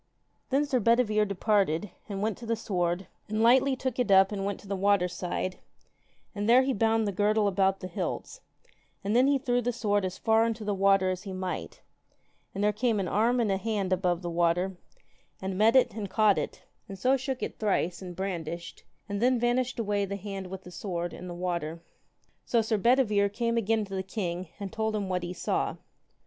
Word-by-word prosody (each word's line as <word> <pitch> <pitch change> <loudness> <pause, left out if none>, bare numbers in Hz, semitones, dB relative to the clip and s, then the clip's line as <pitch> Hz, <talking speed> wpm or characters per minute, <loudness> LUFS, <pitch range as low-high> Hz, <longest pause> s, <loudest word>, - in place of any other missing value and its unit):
Then 275 +2 +2
Sir 265 -3 +1
Bedivere 225 -2 +3
departed, 200 -2 +1 0.2
and 200 0 -3
went 215 -2 0
to 235 - -8
the 230 - +1
sword, 180 -4 -1 0.2
and 215 +1 0
lightly 260 +3 +5
took 260 -1 -3
it 245 - +1
up, 195 0 +6
and 200 -2 -3
went 200 0 -2
to - - -15
the 200 - -2
water 195 -1 +3
side, 180 +1 -4 0.7
and 205 0 -2
there 250 +2 +7
he 265 0 0
bound 225 0 +2
the - - 0
girdle 210 +2 +2
about 195 0 +1
the 185 - -4
hilts, 175 - -4 0.6
and 205 +3 0
then 255 +2 +5
he 280 0 +4
threw 245 -2 0
the 245 +1 0
sword 205 -4 0
as 185 0 -3
far 225 0 +3
into 225 -1 -4
the 205 - 0
water 195 -1 +3
as 185 0 -4
he 195 -2 -7
might, 185 0 -5 0.7
and 200 - -1
there 210 0 +3
came 220 0 +1
an 190 - -1
arm 230 +7 +2
and 220 -4 +1
an 190 - 0
hand 200 -4 -1
above 180 -1 0
the 175 - -3
water, 175 +2 +1 0.6
and 190 0 -4
met 220 +5 +4
it, 245 -4 +5
and 205 -2 -5
caught 215 -1 +3
it, - - -5 0.3
and 195 - -7
so 255 +7 +3
shook 265 0 -3
it - - -5
thrice 185 -4 0
and 180 -2 -7
brandished, 170 -3 -5 0.2
and 200 0 -3
then 250 0 +3
vanished 245 +1 0
away 205 -3 0
the 200 0 -3
hand 195 -1 -6
with 190 +1 -8
the 180 - -11
sword 175 -2 -4
in 180 - -8
the 175 - -6
water. 170 -2 -3 0.6
So 230 -2 +2
Sir 220 -1 0
Bedivere 215 -3 +3
came 230 +3 -1
again 225 -1 +1
to 195 - -10
the 190 - -1
king, 185 -3 -4
and 200 -2 -6
told 220 -1 -1
him 200 -2 -2
what 180 -1 0
he 175 0 -4
saw. 180 - -1
205 Hz, 210 wpm, -28 LUFS, 185-225 Hz, 0.7 s, there